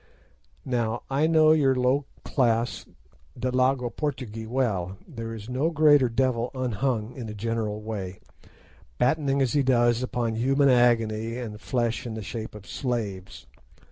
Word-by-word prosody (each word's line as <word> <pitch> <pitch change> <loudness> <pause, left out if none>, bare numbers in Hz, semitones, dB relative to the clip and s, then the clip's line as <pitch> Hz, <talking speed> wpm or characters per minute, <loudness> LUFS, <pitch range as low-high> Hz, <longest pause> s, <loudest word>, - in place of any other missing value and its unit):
Now 120 -3 -1
I 145 +4 +2
know 155 -1 +5
your 140 -4 +4
low 130 +3 +2 0.2
class 120 -3 0 0.5
Delagoa 130 0 +1
Portugee 125 -6 -4
well. 100 -7 -1
There 115 -7 -6
is 110 -1 -9
no 130 +6 0
greater 145 -5 +5
devil 120 0 0
unhung 125 -1 -1
in 120 -4 -6
a 105 - -7
general 110 -1 -2
way, 100 -4 -5 0.8
battening 140 +1 +2
as 125 - 0
he 145 - +3
does 120 -2 +3
upon 120 -2 -1
human 135 +4 +3
agony 115 -2 +2
and 110 -3 -6
flesh 120 -2 -1
in 110 - -5
the 110 - -5
shape 110 +1 -6
of 105 -2 -11
slaves. 105 -8 -4
120 Hz, 140 wpm, -26 LUFS, 110-130 Hz, 0.8 s, know